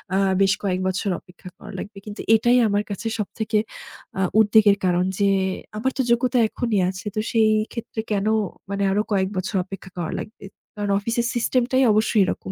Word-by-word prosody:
আ - - +3 0.2
বেশ 195 0 +4
কয়েক 185 -2 0
বছর 190 +2 -1
অপেক্ষা 180 +1 -13
করা - - -11
লাগবে।" 205 0 -8
কিন্তু 210 -1 -7
এটাই 240 +3 +4
আমার 205 0 +1
কাছে 200 +3 -4
সবথেকে 215 +1 -2 0.6
আ - - +1 0.2
উদ্বেগের 210 -1 +5
কারণ 180 0 +2
যে, 200 -1 +3 0.5
আমার 260 +5 0
তো - - +2
যোগ্যতা 245 +1 +2
এখনই 230 -4 -1
আছে। 185 +1 -7
তো - - 0
সেই 220 -2 +4 0.2
ক্ষেত্রে 230 -1 -5
কেন 200 -1 0 0.5
মানে 200 0 -1
আরো 205 +2 +2
কয়েক 190 -2 +1
বছর 190 +3 -3
অপেক্ষা 195 0 -9
করা 170 -2 -3
লাগবে। 210 -2 -9 0.3
কারণ 205 -1 -2
অফিসের 230 +3 -1
সিস্টেমটাই 250 +2 +1
অবশ্যই 215 0 +3
এরকম 190 - -4
210 Hz, 175 wpm, -23 LUFS, 195-230 Hz, 0.6 s, উদ্বেগের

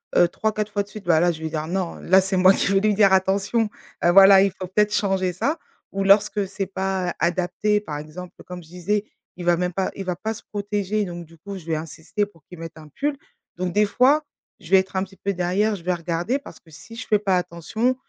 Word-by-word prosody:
heu, 175 - +6
3-4 215 +3 -2
fois 205 -1 0
de 200 - -21
suite, 210 -2 -10
bah, 165 -2 +4
là 175 +1 +3
je 160 - -8
vais 160 - -3
dire: 155 0 -3
«Non», 180 0 -2
là, 190 +1 +5
c'est 190 0 -1
moi 185 +1 +7
qui 195 - 0
vais 195 - +4
lui 210 +1 +2
dire: 200 -1 +4
«Attention, 195 +4 +2 0.3
heu, 175 - +5
voilà, 195 +1 +8
il 200 - +2
faut 185 0 -7
peut-être 210 +3 +1
changer 190 -3 0
ça». 285 - -1 0.3
Ou 195 0 -2
lorsque 200 0 +3
c'est 195 0 -4
pas 190 -1 -2
adapté, 185 +4 +1
par 155 -8 -6
exemple 170 +5 -9
comme 180 -1 -8
je 160 - -17
disais, 200 +4 -1 0.3
il 175 - -6
va 175 0 +4
même 180 +1 -1
pas 190 +1 -1
il 195 - -5
va 180 -1 -2
pas 220 +4 -3
se 220 - -12
protéger, 205 0 -2
donc 175 -1 -7
du 165 +1 -19
coup 200 +4 -8
je 170 - -12
vais 165 - -1
insister 165 +6 -3
pour 165 -7 -22
qu'il 180 -2 -12
mette 165 0 -8
un 155 -1 -13
pull. 290 0 0 0.4
Donc 180 0 -2
des 210 +2 +3
fois, 265 +8 +3 0.4
je 165 - -14
vais 190 - +8
être 190 0 -4
un 190 - +1
petit 195 0 -11
peu 200 - -2
derrière, 190 +4 0
je 170 - -14
vais 180 +1 +1
regarder. 175 +8 -1
Parce 285 - -12
que 165 - -23
si 195 +9 -13
je 245 - -7
fais 210 - +3
pas 195 -3 +1
attention 180 +8 -1
190 Hz, 250 wpm, -23 LUFS, 175-205 Hz, 0.4 s, voilà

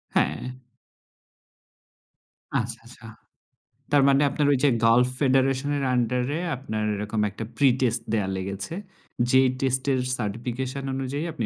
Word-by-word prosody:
হ্যাঁ। 75 - 0 2.1
আচ্ছা, - - -4
আচ্ছা। - - -14 0.9
তার 145 -1 +5
মানে 140 +1 +4
আপনার 145 0 0
ওই - - +2
যে 145 - +6 0.2
গাল্ফ 120 +2 +5
ফেডারেশনের 135 +1 +2
আন্ডারে 125 +4 0 0.2
আপনার 110 -5 -4
এরকম 105 +1 -2
একটা 105 +3 -7
প্রিটেস্ট 125 -3 +2
দেয়া 100 -3 +1
লেগেছে? 100 - -5 0.6
যেই 130 0 +5
টেস্টের 130 0 +1 0.2
সার্টিফিকেশন 125 +5 -4
অনুযায়ী 135 +3 -3
আপনি 120 -8 -3
130 Hz, 115 wpm, -25 LUFS, 115-135 Hz, 2.1 s, যে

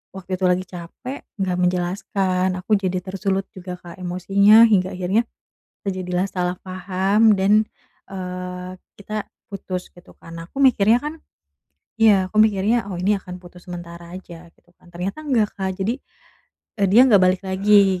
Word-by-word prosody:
waktu 185 -1 -5
itu 185 - -1
lagi 180 +1 +2
capek 185 +10 -8 0.2
gak 180 -1 -1
menjelaskan 185 +1 0
aku 210 +4 -2
jadi 185 -2 -2
tersulut 195 0 -2
juga 180 -1 -7
Kak 175 - -11
emosinya 200 +5 +5
hingga 185 -3 +3
akhirnya 190 +6 +1 0.6
terjadilah 185 -1 -1
salah 180 -1 -2
paham 190 +4 +2
dan, 205 +3 +4 0.5
eee, 180 -1 -6 0.3
kita 215 +1 -5 0.2
putus 185 -2 -6
gitu 175 - -18
kan. 165 - -13 0.2
Aku 275 +8 -3
mikirnya 230 -3 +5
kan 300 +2 -4 0.9
iya 195 -4 +5
aku 215 - -5
mikirnya, 215 +1 +3
"Oh 190 - -5
ini 200 +2 +2
akan 180 -1 -10
putus 180 +1 -15
sementara 170 0 -9
aja." 175 -2 -11
Gitu - - -32
kan, - - -23
ternyata 185 - -4
enggak 230 -7 +2
Kak 190 -1 -2
jadi, 230 +6 -1 0.8
eee, 200 - +4
dia 225 - +7
gak 200 -3 +6
balik 185 +1 +3
lagi 195 -1 +4
190 Hz, 155 wpm, -21 LUFS, 180-205 Hz, 0.9 s, dia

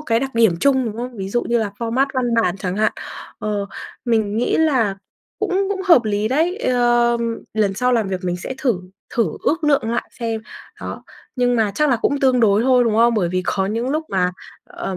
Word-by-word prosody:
cái 230 -6 0
đặc 270 -1 -4
điểm 225 -6 +4
chung, 265 -2 +3
đúng 220 -2 -4
không? 245 +1 -6
Ví 190 -2 -4
dụ 240 +4 0
như 235 - +1
là 220 -3 -1
format 240 +4 0
văn 255 -1 +1 0.2
bản 180 -2 0
chẳng 185 -1 -3
hạn. 215 0 +2 0.5
Ờ, 205 -1 -2 0.4
mình 220 -4 +1
nghĩ 240 - +1
là 255 -11 +2 0.4
cũng 395 -1 0
cũng 395 -1 -2
hợp 335 -11 +6
lý 210 0 0
đấy, 325 - +1
ơ, 240 - +2 0.4
lần 210 -3 +1
sau 250 +5 +1
làm 225 -5 +1
việc 185 -1 -3
mình 175 -1 -1
sẽ 180 +9 -6
thử 245 -10 0 0.3
thử 230 - +2 0.2
ước 320 +1 0
lượng 280 -6 +2
lại 235 - -2
xem. 225 -1 -2 0.4
Đó, - - -6 0.3
nhưng 245 -1 +2
mà 220 -2 +2
chắc 300 +4 +2
là 250 - +3
cũng 280 +5 0
tương 255 -2 +3
đối 210 -1 +4
thôi, 250 -1 +4
đúng 225 -2 +1
không? 235 +1 +4
Bởi 190 -6 +1
vì 185 +1 -1
khó 190 +1 0
những 230 +5 -2
lúc 310 +2 -1
mà, 180 -2 +1 0.3
ờ, 190 - -6
235 Hz, 220 wpm, -20 LUFS, 210-260 Hz, 0.5 s, hợp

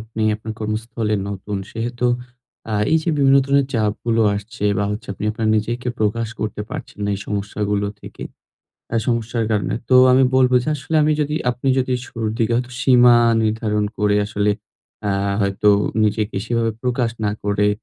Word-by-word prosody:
আপনি 110 0 -5
আপনার 110 +1 -6
কর্মস্থলে 110 0 -2
নতুন, 100 +1 -5 0.2
সেহেতু 120 +2 -2 0.6
আ - - -2 0.2
এই 160 - +6
যে 170 - -3
বিভিন্ন 135 -1 +5
ধরনের 140 0 +2
চাপগুলো 110 +1 0
আসছে 105 +1 -6
বা 100 - +1
হচ্ছে, 105 +1 -5
আপনি 100 - -6
আপনার 110 0 -2
নিজেকে 120 +4 -2
প্রকাশ 110 +2 0
করতে 105 -1 -3
পারছেন - - -7
না, 100 - -1
এই 100 - -6
সমস্যাগুলো 105 0 -2
থেকে। - - -10 0.7
আ - - +3
সমস্যার 115 0 0
কারণে 105 -4 0
তো 130 - +3 0.2
আমি 130 +1 +5
বলবো 130 -1 +4
যে, - - -4
আসলে 145 +4 -2
আমি 155 +1 +3
যদি, 150 0 -1 0.2
আপনি 125 +2 -3
যদি 130 0 0
শুরুর 115 -3 -3
দিকে 115 -1 +1
হয়তো 125 0 -2
সীমা 125 -2 +6 0.3
নির্ধারণ 110 -1 0
করে, 105 0 +2
আসলে 105 0 0 0.6
আ - - +1 0.3
হয়তো 100 +1 +1 0.3
নিজেকে 105 -1 0
সেভাবে 115 -1 0
প্রকাশ 125 -2 0
না 105 - +2
করে, 105 0 +2
110 Hz, 170 wpm, -20 LUFS, 105-125 Hz, 0.7 s, এই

